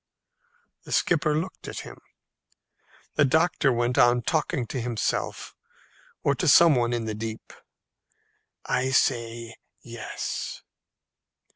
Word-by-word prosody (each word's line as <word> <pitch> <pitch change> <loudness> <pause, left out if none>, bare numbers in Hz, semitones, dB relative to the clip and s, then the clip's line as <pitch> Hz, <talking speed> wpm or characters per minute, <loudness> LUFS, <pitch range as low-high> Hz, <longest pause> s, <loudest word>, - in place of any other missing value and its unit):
The - - -12
skipper 150 -3 +2
looked 180 +3 -5
at - - -5
him. - - -11 1.2
The - - +5
doctor 160 0 +2
went 120 0 0
on 120 0 +4
talking 150 -3 0
to 125 +3 -4
himself, 115 -2 -3 0.7
or 140 - +3
to 175 - -2
some 165 +3 +7
one 120 -2 +1
in 120 -2 -2
the 110 - -3
deep, 110 +1 -7 1.1
"I 130 +1 0
say, 115 -3 0 0.3
Yes." 120 0 -5
125 Hz, 115 wpm, -26 LUFS, 115-150 Hz, 1.2 s, some